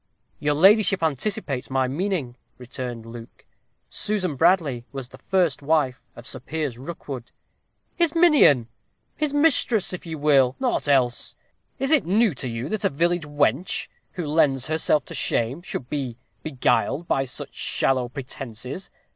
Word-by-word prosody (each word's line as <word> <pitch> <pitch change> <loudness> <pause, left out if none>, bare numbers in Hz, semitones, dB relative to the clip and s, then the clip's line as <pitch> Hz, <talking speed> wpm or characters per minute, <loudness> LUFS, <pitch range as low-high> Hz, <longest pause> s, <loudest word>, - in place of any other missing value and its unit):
"Your 145 0 +1
ladyship 195 +2 +5
anticipates 145 - -2
my 130 -1 +1
meaning," 150 -3 -2 0.2
returned 125 -2 -6
Luke. 115 0 -11 0.4
"Susan 190 -7 -2
Bradley 160 -6 +2
was 135 -3 -6
the - - -13
first 175 -7 +1
wife 145 -4 +1
of - - -11
Sir - - -3
Piers 150 -7 -4
Rookwood." 135 -4 -7 0.6
"His 340 -2 +2
minion 295 - +5 0.5
his 300 -2 -1
mistress 280 - +3
if 180 - -7
you 160 -1 -5
will; 140 -3 +3
nought 255 - 0
else. 130 -4 +1 0.4
Is 270 +2 -1
it 310 - +5
new 210 +2 +2
to 130 -1 -3
you, 115 +3 -4
that 215 0 -2
a - - +3
village 170 +3 0
wench, 145 - 0 0.2
who 175 - -4
lends 145 -4 +2
herself 155 -3 +1
to - - -9
shame, 120 +8 0
should 135 -8 -5
be 130 -5 -4 0.2
beguiled 155 +3 0
by 135 - +1
such 125 - -6
shallow 130 -2 +1
pretences? 130 - -6
145 Hz, 145 wpm, -24 LUFS, 130-180 Hz, 0.6 s, ladyship